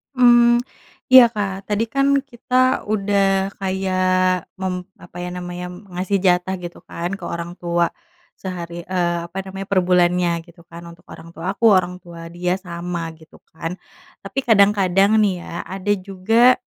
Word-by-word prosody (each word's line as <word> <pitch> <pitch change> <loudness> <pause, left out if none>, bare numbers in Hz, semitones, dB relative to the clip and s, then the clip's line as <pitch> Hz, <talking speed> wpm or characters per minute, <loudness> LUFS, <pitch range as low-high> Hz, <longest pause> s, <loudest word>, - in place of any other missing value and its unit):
Mmm, 240 -1 +5 0.5
iya, 255 -2 +10
Kak. 200 -4 -4
Tadi 210 +1 0
kan 275 0 +2 0.2
kita 250 -1 -6 0.3
udah 195 -2 +1
kayak 185 -1 +1
mem 190 -1 -3 0.2
apa 175 0 -14
ya 175 - -4
namanya, 180 0 -6 0.3
ngasih 185 +3 -1
jatah 180 0 +2
gitu 175 0 -8
kan 170 +1 -4
ke - - -7
orang 170 0 -5
tua, 170 -1 0 0.5
sehari, 175 -2 -6
eee, 175 -2 0
apa 175 - -11
namanya, 195 0 -7
per 200 -2 +2
bulannya, 175 -1 +2
gitu 170 0 -17
kan, 170 +1 -10
untuk 170 0 -14
orang 165 - -11
tua 175 +4 -3
aku, 215 +4 -1
orang 185 -4 +3
tua 165 -1 -10
dia 180 +1 -1
sama, 170 -2 -5
gitu 160 - -19
kan. 165 +2 -5 0.5
Tapi - - -3
kadang-kadang 200 -1 +4
nih 190 -4 +1
ya, - - -10 0.2
ada 195 +2 -2 0.2
juga, 225 +6 +4
185 Hz, 155 wpm, -21 LUFS, 175-200 Hz, 0.5 s, iya